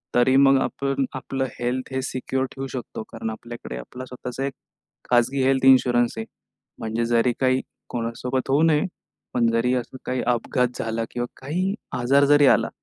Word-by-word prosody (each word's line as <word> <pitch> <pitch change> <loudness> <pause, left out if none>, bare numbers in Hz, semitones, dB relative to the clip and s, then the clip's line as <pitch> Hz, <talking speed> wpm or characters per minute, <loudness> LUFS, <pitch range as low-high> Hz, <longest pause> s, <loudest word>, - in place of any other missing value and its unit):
तरी 125 +2 +4
मग 135 0 +6
आपण 135 -1 -1
आपलं 130 +1 -2
हेल्थ 130 +2 -2
हे 130 - 0
सिक्योर 130 0 -2
ठेवू 135 0 -5
शकतो. 125 -4 -6
कारण 110 - -5
आपल्याकडे 120 - -8
आपला 125 - -8
स्वतःचा 125 +1 -5
एक 140 - -3 0.6
खाजगी 125 +2 +3
हेल्थ 135 0 +2
इन्शुरन्स 120 -3 +5
आहे. 110 - -3 0.5
म्हणजे 110 +1 -2
जरी 120 +1 +3
काही 130 0 +2 0.3
कोणासोबत 125 +2 -3
होऊ 140 +3 +4
नये, 160 +2 +4 0.5
पण 120 -2 +3
जरी 115 +2 +2
असं 125 +1 -4
काही 130 0 -1
अपघात 125 +1 +1
झाला 115 0 -1
किंवा 120 0 -2 0.2
काही 180 +8 -1 0.3
आजार 140 +4 +4
जरी 145 -1 +7
आला, - - +4
130 Hz, 165 wpm, -24 LUFS, 120-135 Hz, 0.6 s, जरी